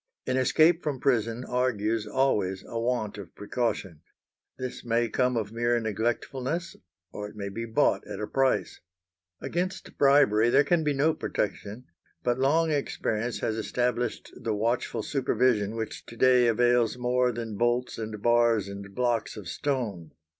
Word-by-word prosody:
An 130 - 0
escape 160 +6 +4
from 145 -4 -3
prison 120 -3 0
argues 115 -3 0
always 105 -7 0
a 115 - -4
want 115 -3 -1
of 95 -4 -10
precaution. 105 -7 -3 0.6
This 130 -1 -6
may 120 -1 +1
come 125 +1 +1
of 105 -2 -2
mere 120 +1 +1
neglectfulness, 120 - -2 0.4
or 105 0 -6
it 105 - -16
may 100 -1 -4
be 115 +4 -5
bought 115 -1 +1
at - - -6
a 105 - -2
price. 135 +3 0 0.6
Against 185 +3 -3
bribery 120 -6 +5
there 140 +4 +5
can 165 +2 +2
be 150 -1 +1
no 150 +4 +3
protection, 105 +1 -4 0.4
but 120 +1 0
long 160 +4 +3
experience 120 -5 -2
has 110 - -1
established 120 +1 -2
the 110 -2 -2
watchful 115 +4 -1
supervision, 120 -5 +1
which 110 -1 -5
to 115 - -11
day 125 -1 +5
avails 120 0 +3
more 125 0 +1
than 115 -2 -5
bolts 120 +2 0
and 110 -2 -6
bars 120 -3 +3
and 100 0 -9
blocks 120 -3 0
of 100 -5 -8
stone. 105 - -3
120 Hz, 155 wpm, -27 LUFS, 110-130 Hz, 0.6 s, bribery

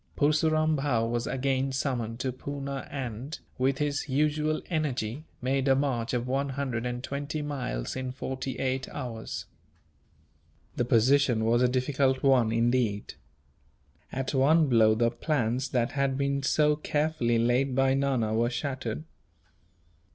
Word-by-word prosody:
Purseram 155 +1 +2
Bhow 130 -5 +1
was 120 +1 -2
again 135 +1 0
summoned 125 -4 -2
to 130 - -1
Poona 140 +1 -5
and, 130 +2 -5 0.2
with 135 +1 +2
his 145 0 -1
usual 150 +2 +1
energy, 145 -4 -2 0.2
made 135 +1 +1
a 135 - +5
march 130 -4 0
of 120 0 -2
one 135 +2 0
hundred 130 -3 -2
and 125 0 -4
twenty 145 +3 -3
miles 130 - -3
in 130 -1 -3
forty 130 0 -4
eight 130 0 -1
hours. 115 - -5 1.3
The 120 - 0
position 120 -1 +3
was 120 +2 +3
a 125 - +5
difficult 130 +1 +1
one, 130 -5 +4
indeed. 115 -3 +1 1.0
At 135 +1 -3
one 150 +4 +4
blow, 110 -4 +5
the 115 +1 +2
plans 125 -1 -1
that 120 -2 0
had 140 -2 0
been 140 0 0
so 150 +2 +3
carefully 150 -6 0
laid 125 +3 +2
by 135 0 +3
Nana 135 -5 +1
were 115 +2 +2
shattered. 125 - -3
130 Hz, 140 wpm, -28 LUFS, 120-140 Hz, 1.3 s, a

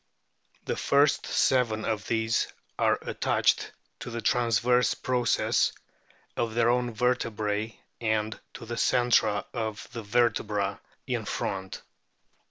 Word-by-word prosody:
The - - -1
first 140 +1 +2
seven 115 -4 +2
of 110 -2 -2
these 115 0 +1 0.3
are - - +3
attached - - +1 0.3
to - - -6
the 115 0 -4
transverse 120 +1 +2
process 125 -2 +1 0.6
of 115 -1 -2
their 120 0 +4
own 125 0 0
vertebrae 110 -3 -1 0.2
and 110 -1 -1 0.2
to - - -8
the 120 +1 -5
centra 120 -5 +2
of 110 -3 -4
the 115 - -5
vertebra 105 -2 0 0.2
in - - -2
front. 95 -1 -4
115 Hz, 115 wpm, -28 LUFS, 110-120 Hz, 0.6 s, their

